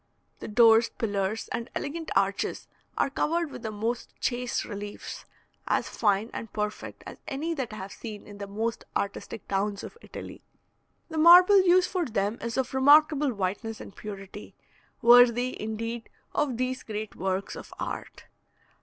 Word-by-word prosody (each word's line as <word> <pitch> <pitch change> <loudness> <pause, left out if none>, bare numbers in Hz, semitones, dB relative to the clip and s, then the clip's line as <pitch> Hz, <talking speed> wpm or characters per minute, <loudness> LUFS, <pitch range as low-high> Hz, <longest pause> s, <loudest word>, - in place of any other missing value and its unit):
The - - -7
doors, 225 +1 +6
pillars, 205 0 -2
and 235 +2 -3
elegant 320 +3 -4
arches 195 0 0 0.3
are - - +1
covered 330 +2 0
with - - -8
the 220 - -3
most 225 +3 -3
chaste 245 0 -1
reliefs, 205 0 -7 0.4
as - - +1
fine 210 +1 +1
and 225 - -6
perfect 210 0 -4
as - - -9
any 310 +4 -2
that 260 -6 -3
I - - -7
have 190 -1 -7
seen 215 -3 -8
in 205 -1 -12
the 200 - -5
most 225 +3 -3
artistic 200 +1 -5
towns 200 +1 -1
of 460 - -10
Italy. - - -9 0.7
The 320 -1 -3
marble 360 +4 +9
used 365 0 +4
for 360 -2 0
them 205 0 -1
is 235 +1 -3
of 265 -1 -1
remarkable 290 +1 +5
whiteness 210 +2 -3
and - - -10
purity, 200 -1 -9 0.5
worthy, 245 +1 +6
indeed, 230 +2 -4 0.2
of 275 -6 0
these 255 +1 -1
great 215 -1 -6
works 190 +1 -2
of - - -10
art. - - -5
230 Hz, 155 wpm, -27 LUFS, 205-270 Hz, 0.7 s, marble